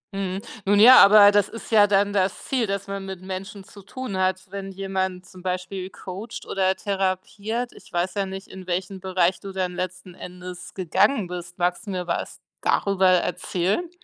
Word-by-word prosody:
Mhm, 195 Hz, -1 st, -3 dB, 0.2 s
nun 205 Hz, +1 st, +4 dB
ja, 250 Hz, +4 st, +10 dB
aber 205 Hz, 0 st, +8 dB
das 205 Hz, -1 st, +2 dB
ist 230 Hz, -, -10 dB
ja 210 Hz, -2 st, +6 dB
dann 200 Hz, 0 st, +2 dB
das 190 Hz, -1 st, 0 dB
Ziel, 250 Hz, -4 st, 0 dB
das 200 Hz, 0 st, -3 dB
man 195 Hz, 0 st, -5 dB
mit 190 Hz, -2 st, -7 dB
Menschen 195 Hz, +2 st, -6 dB
zu 200 Hz, +1 st, -14 dB
tun 230 Hz, +2 st, -6 dB
hat, 185 Hz, 0 st, 0 dB
wenn 195 Hz, -1 st, -6 dB
jemand 190 Hz, -1 st, -3 dB
zum 185 Hz, -, -14 dB
Beispiel 185 Hz, +1 st, -4 dB
coacht 195 Hz, +4 st, -8 dB
oder 190 Hz, -1 st, +1 dB
therapiert. 200 Hz, +5 st, -2 dB
Ich -, -, -16 dB
weiß 175 Hz, +1 st, -1 dB
ja 200 Hz, -2 st, -1 dB
nicht, 190 Hz, +1 st, -7 dB
in 185 Hz, -1 st, -11 dB
welchem 185 Hz, +2 st, -3 dB
Bereich 185 Hz, -1 st, +1 dB
du 195 Hz, -, -8 dB
dann 185 Hz, -1 st, -2 dB
letzten 185 Hz, 0 st, -5 dB
Endes 180 Hz, 0 st, -9 dB
gegangen 195 Hz, -, +2 dB
bist. 175 Hz, 0 st, -7 dB
Magst 180 Hz, +3 st, -1 dB
du -, -, -4 dB
mir 180 Hz, -1 st, -3 dB
was 170 Hz, -, -3 dB, 0.2 s
darüber 195 Hz, -1 st, +2 dB
erzählen? 185 Hz, -, 0 dB
190 Hz, 185 wpm, -24 LUFS, 185-200 Hz, 0.2 s, ja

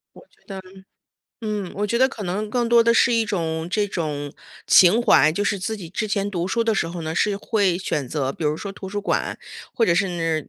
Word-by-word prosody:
我 -, -, -13 dB
觉 -, -, -31 dB
得 195 Hz, -1 st, -7 dB, 0.8 s
嗯， 210 Hz, -4 st, -4 dB
我 205 Hz, +1 st, -1 dB
觉 235 Hz, +3 st, 0 dB
得 260 Hz, +1 st, +4 dB
可 230 Hz, -5 st, -8 dB
能 200 Hz, +4 st, -3 dB
更 240 Hz, 0 st, 0 dB
多 235 Hz, -1 st, +5 dB
的 235 Hz, -, +4 dB
是 235 Hz, +1 st, +4 dB
一 230 Hz, -1 st, +2 dB
种 165 Hz, -5 st, -2 dB
这 205 Hz, +2 st, +1 dB
种 150 Hz, -6 st, -4 dB, 0.3 s
情 190 Hz, +6 st, +6 dB
怀。 155 Hz, -, +5 dB
就 200 Hz, -, -2 dB
是 205 Hz, 0 st, 0 dB
自 220 Hz, +4 st, -3 dB
己 180 Hz, -5 st, -9 dB
之 200 Hz, +5 st, -3 dB
前 205 Hz, -1 st, -1 dB
读 175 Hz, -2 st, -2 dB
书 230 Hz, +4 st, 0 dB
的 225 Hz, -1 st, +1 dB
时 180 Hz, -, 0 dB
候 170 Hz, 0 st, -6 dB
呢， 160 Hz, 0 st, -4 dB
是 205 Hz, +3 st, +1 dB
会 200 Hz, -4 st, 0 dB
选 150 Hz, -7 st, -2 dB
择 135 Hz, 0 st, -2 dB
比 160 Hz, -, -6 dB
如 150 Hz, +1 st, +1 dB
说 200 Hz, -, -6 dB
图 190 Hz, 0 st, -9 dB
书 205 Hz, +1 st, -3 dB
馆， 205 Hz, -, -2 dB, 0.4 s
或 230 Hz, -, +2 dB
者 170 Hz, -, +3 dB
是， 170 Hz, -4 st, -1 dB
195 Hz, 250 characters per minute, -22 LUFS, 165-215 Hz, 0.8 s, 情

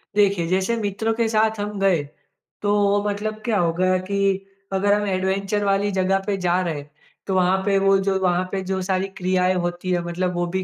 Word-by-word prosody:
देखिए, 200 Hz, -4 st, +3 dB
जैसे 190 Hz, +6 st, +1 dB
मित्रों 215 Hz, +1 st, -1 dB
के 230 Hz, 0 st, 0 dB
साथ 220 Hz, 0 st, +1 dB
हम 205 Hz, -1 st, -4 dB
गए, 185 Hz, -6 st, +2 dB, 0.6 s
तो 205 Hz, 0 st, +1 dB
वो 205 Hz, 0 st, +2 dB
मतलब 215 Hz, +1 st, -4 dB
क्या 225 Hz, -3 st, +1 dB
होगा 180 Hz, +2 st, +2 dB
कि 195 Hz, +1 st, -1 dB, 0.3 s
अगर 200 Hz, +1 st, +2 dB
हम 210 Hz, 0 st, +1 dB
एडवेंचर 195 Hz, +2 st, -1 dB
वाली 200 Hz, +1 st, +1 dB
जगह 190 Hz, 0 st, +1 dB
पे 205 Hz, -, +1 dB
जा 175 Hz, +1 st, +3 dB
रहे 170 Hz, -3 st, -1 dB
हैं, 145 Hz, 0 st, -9 dB, 0.4 s
तो 190 Hz, -, 0 dB
वहाँ 185 Hz, +1 st, +3 dB
पे 200 Hz, -1 st, +3 dB
वो 195 Hz, 0 st, +4 dB
जो 195 Hz, 0 st, 0 dB
वहाँ 180 Hz, 0 st, +2 dB
पे 195 Hz, -1 st, -2 dB
जो 190 Hz, 0 st, -2 dB
सारी 190 Hz, 0 st, -1 dB
क्रियाएँ 185 Hz, 0 st, +1 dB
होती 175 Hz, +1 st, -3 dB
है, 175 Hz, -, +1 dB
मतलब 180 Hz, +1 st, -2 dB
वो 175 Hz, -, 0 dB
भी 190 Hz, -, 0 dB
195 Hz, 210 wpm, -22 LUFS, 185-205 Hz, 0.6 s, वो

